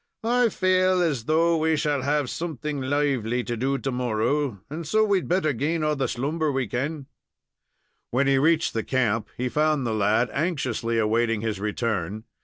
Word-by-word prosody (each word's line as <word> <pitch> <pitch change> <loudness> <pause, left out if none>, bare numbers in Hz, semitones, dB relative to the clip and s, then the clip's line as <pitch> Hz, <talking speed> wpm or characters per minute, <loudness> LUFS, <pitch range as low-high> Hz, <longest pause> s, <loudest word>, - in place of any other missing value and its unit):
I 240 +1 +3
faal 185 -1 +2
as 140 -9 -1
though 165 +3 +3
we 160 0 +2
shall 145 -2 0
have 145 +1 0
something 150 -2 -4
lively 130 -4 0
to 120 +2 -3
do 135 +4 0
to 135 +1 -3
morrow, 125 0 -1
and 155 +2 -6
so 215 +5 +3
we'd 200 -3 +1
better 175 -4 +1
gain 155 +6 -1
all 150 0 +1
the 135 -2 -1
slumber 150 +5 -1
we 135 -2 -1
kin." 140 +6 -3 1.0
When 130 +3 +1
he 135 -1 +3
reached 160 +3 +2
the 115 - -1
camp, 115 -5 0
he 125 - -1
found 150 +1 +1
the 115 - -1
lad 110 +3 +2
anxiously 130 -8 -1
awaiting 115 0 +1
his 110 -3 -2
return. 105 -2 -2
135 Hz, 175 wpm, -25 LUFS, 115-155 Hz, 1.0 s, I